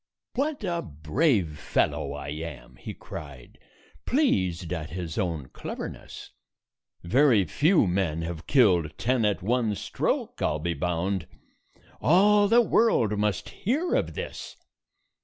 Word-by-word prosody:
"What 280 -1 -2
a 170 -3 -1
brave 80 - 0
fellow 70 - 0
I 70 -1 -6
am!" 75 -2 -7
he - - -7
cried, 70 -5 -10 0.5
pleased 95 - +1
at 80 -3 -4
his 85 -2 -5
own 80 - -2
cleverness. - - -8 0.7
"Very 115 +2 +4
few 155 - +3
men 90 -3 -1
have 85 -1 -6
killed 90 - +3
ten 125 -2 +1
at 100 -4 0
one 115 0 +1
stroke, - - -2
I - - +3
'll - - -2
be 85 +3 -2
bound. 90 +3 -2 0.7
All 205 +5 +5
the 235 +3 +6
world 215 - +3
must 105 -2 -1
hear 295 - -1
of - - 0
this." - - -7
95 Hz, 130 wpm, -26 LUFS, -, 0.7 s, the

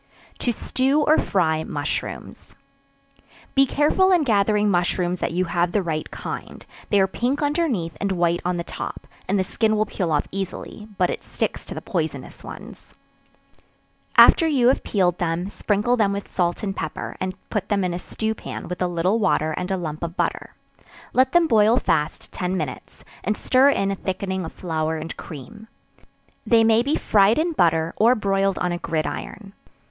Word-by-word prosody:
To 245 - 0
Stew 265 +5 +1
or 305 +1 +4
Fry 160 -4 +1
Mushrooms. 145 -2 -5 1.0
Be 275 0 +4
careful 305 +8 +3
in 350 -4 +4
gathering 210 -3 +2
mushrooms 175 0 0
that - - -1
you 180 +2 0
have 175 0 0
the 205 - +1
right 155 -2 -3
kind; - - -7 0.2
they 205 - +4
are 190 - +5
pink 250 +9 -1
underneath, 285 - 0
and 200 0 0
white 175 -1 +1
on 180 0 -1
the 170 - -2
top, - - -6 0.2
and 200 - +1
the 190 - +2
skin 215 +3 0
will 215 - +2
peel 180 -5 -3
off 145 -1 +1
easily, 195 +2 -6
but 180 - +2
it - - -5
sticks - - -3
to - - -7
the - - -6
poisonous - - -4
ones. - - -11 1.2
After 330 - +8
you 260 -6 +4
have 265 - +2
peeled 180 -4 +1
them, 175 +3 -1
sprinkle 210 +5 +1
them 210 -4 +2
with 200 0 -6
salt 175 +1 0
and 195 -2 -2
pepper, 160 -5 -5
and 185 0 -3 0.2
put 200 -2 -2
them 200 -2 +1
in 180 -1 -1
a 175 - -3
stew 220 +4 -3
pan, - - -7
with 180 +1 -6
a 180 - +2
little 175 +5 +1
water, 160 -6 +1
and 180 +4 -3
a 190 - 0
lump 155 -3 -5
of 170 +1 -5
butter; - - -2 0.6
let 260 +1 +3
them 345 +1 +5
boil 220 -1 +4
fast 160 -9 -1
ten 185 +1 -2
minutes, 150 -6 -6 0.2
and 210 +3 -1
stir 265 +2 +4
in 195 -8 +1
a - - -1
thickening 190 -1 -3
of - - -7
flour 160 -2 -2
and 160 +1 -6
cream. 195 - -10 0.8
They 230 -1 +4
may 225 0 +4
be 280 +5 0
fried 205 +1 +3
in 330 +3 +1
butter, 165 - +2
or 235 +3 +5
broiled 195 -2 +1
on 180 - -1
a 175 - -3
gridiron. 175 +5 -4
195 Hz, 185 wpm, -23 LUFS, 175-225 Hz, 1.2 s, After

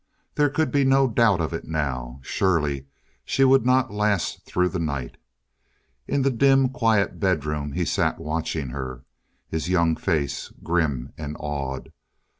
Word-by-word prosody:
There 145 -1 +3
could 145 -1 0
be 140 -1 +3
no 135 0 +4
doubt 110 -6 +3
of 80 - -2
it 80 - -4
now. 65 -5 -3
Surely 75 -5 0 0.4
she 135 - +1
would 135 -2 +5
not 130 -4 +3
last 105 -3 0
through 90 0 +1
the 90 - -3
night. 70 -6 -3 0.9
In 140 -1 +1
the 135 - +3
dim 135 +1 +4
quiet 115 -5 +1
bedroom 75 -6 -1
he - - 0
sat - - +1
watching 80 -2 -3
her, 65 -1 -6 0.4
his 80 +2 -3
young 85 -3 +3
face 75 -3 -2
grim 75 -7 -1
and 75 -1 -5
awed. 70 -3 -4
80 Hz, 150 wpm, -24 LUFS, 70-115 Hz, 0.9 s, would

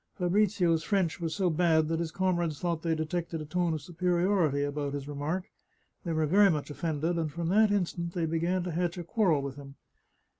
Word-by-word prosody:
Fabrizio's 180 -3 +2
French 185 -3 0
was 165 -1 -2
so 185 -4 +1
bad 160 -1 +3
that 165 0 -1
his 170 -1 -2
comrades 175 -4 0
thought 170 -2 -1
they 165 -1 0
detected 165 +1 -3
a 155 - -6
tone 175 +2 0
of 150 - -6
superiority 175 -3 +1
about 145 0 -2
his 140 -1 -5
remark; 145 +6 -2 0.6
they 170 - -3
were 160 -1 +1
very 200 +6 +5
much 150 -3 -2
offended, 160 +2 -1
and 160 -2 -2
from 170 +2 -3
that 215 +3 +5
instant 170 -3 -1
they 170 -2 0
began 170 +3 0
to 180 - -3
hatch 175 +1 -1
a 175 - -4
quarrel 170 -6 +1
with 140 0 -5
him. 140 -1 -11
170 Hz, 200 wpm, -29 LUFS, 155-180 Hz, 0.6 s, very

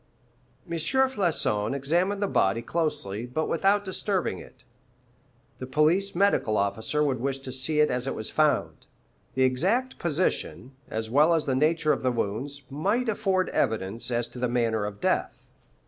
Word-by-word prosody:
M. - - -14
Floçon 170 - +1
examined 175 +9 0
the - - +1
body 105 - +1
closely, 120 -10 -2
but 155 +6 -2
without 200 +4 +2
disturbing 190 0 -1
it. - - -15 1.0
The 130 - -6
police 160 +9 +2
medical 175 - +2
officer 110 +9 0
would 135 -4 0
wish 135 +2 -1
to 135 -1 -8
see 130 +4 +1
it 150 - +3
as 125 +1 -2
it - - -2
was 110 - -5
found. 155 -2 +1 0.5
The 130 - +3
exact 190 - +1
position, 155 -5 -1 0.2
as 110 0 -4
well 155 +6 +5
as 160 - 0
the 135 - 0
nature 155 +3 +2
of - - -3
the 130 - +1
wounds, 125 +6 -3
might 205 - 0
afford 195 -3 0
evidence 110 +1 -1
as 120 -1 -1
to 125 - -10
the 125 0 0
manner 115 -3 0
of 100 -1 -8
death. - - +1
140 Hz, 165 wpm, -26 LUFS, 120-180 Hz, 1.0 s, well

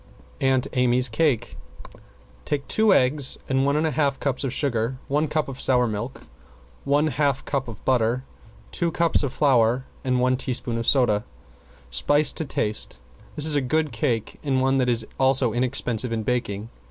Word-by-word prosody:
~AUNT 130 -1 +2
AMY'S 125 0 +3
CAKE~ 120 -2 0 0.9
Take 140 -1 -3
two 220 -1 +3
eggs, 135 -3 +3
one 135 +2 +1
and 155 - +1
one - - +1
half 145 -2 0
cups 140 -2 -2
of 135 - -2
sugar, 120 -2 -1
one 150 +3 0
cup 155 +1 -1
of 135 -1 -7
sour 125 -2 +3
milk, 115 +3 -5 0.6
one 145 +2 +2
half 145 -3 0
cup 135 -2 -2
of 115 -3 -10
butter, 125 0 +1 0.5
two 170 - 0
cups 170 0 +1
of 140 -4 -2
flour 130 -3 +2 0.2
and 125 -1 0
one 130 +1 +2
teaspoonful 125 -2 -1
of 115 - -4
soda. 110 -6 +3 0.7
Spice 145 - +2
to 160 - -3
taste. 105 - -2 0.4
This 150 - -1
is 155 - +3
a 145 - +2
good 155 +3 0
cake 115 -4 -2
and 135 -3 0
one 135 +1 +2
which 125 -1 +1
is 115 -2 +2
also 130 -3 +3
inexpensive 125 -1 -1
in 110 -1 -2
baking. 110 -2 -3
130 Hz, 170 wpm, -24 LUFS, 120-145 Hz, 0.9 s, AMY'S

